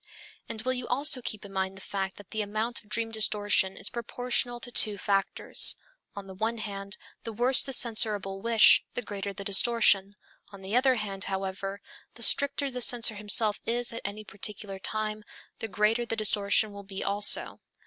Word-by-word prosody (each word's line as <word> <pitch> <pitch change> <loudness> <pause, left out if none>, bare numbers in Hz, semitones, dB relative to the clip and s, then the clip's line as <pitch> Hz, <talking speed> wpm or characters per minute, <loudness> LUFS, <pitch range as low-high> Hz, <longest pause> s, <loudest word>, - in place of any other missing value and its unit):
And 220 -1 -6
will 255 +1 0
you 250 -1 -4
also 270 +1 +2
keep 215 -3 -5
in 195 - -12
mind 190 0 -3
the - - -10
fact 190 0 -4
that 205 -4 -15
the 220 - -2
amount 215 +3 -3
of 210 - -26
dream 225 +1 0
distortion 205 -3 +1
is - - -2
proportional 245 +1 -1
to 245 - -4
two 210 -3 +4
factors. 195 0 +3 0.4
On 200 -1 -8
the 190 - -10
one 220 +5 -2
hand, 200 -2 -7 0.3
the 230 - -6
worse 245 +4 +2
the 270 - -2
censorable 210 -5 +1
wish, 230 0 +5
the 245 - -3
greater 200 -1 -6
the 200 0 -8
distortion; 200 -1 +2 0.4
on 195 -1 -13
the 195 +4 -3
other 260 +1 +3
hand, 195 -4 -4
however, 195 +1 -5 0.3
the 235 - -6
stricter 280 +4 +2
the 250 0 -5
censor 240 -2 +3
himself 210 +1 +2
is 240 0 -1
at 230 - -6
any 205 +2 -6
particular 200 -1 -5
time 215 +1 -4 0.4
the 225 - -4
greater 210 +4 +1
the 230 -1 -4
distortion 210 0 +2
will 200 - -9
be 195 0 -6
also. 205 +1 +2
210 Hz, 185 wpm, -27 LUFS, 200-235 Hz, 0.4 s, wish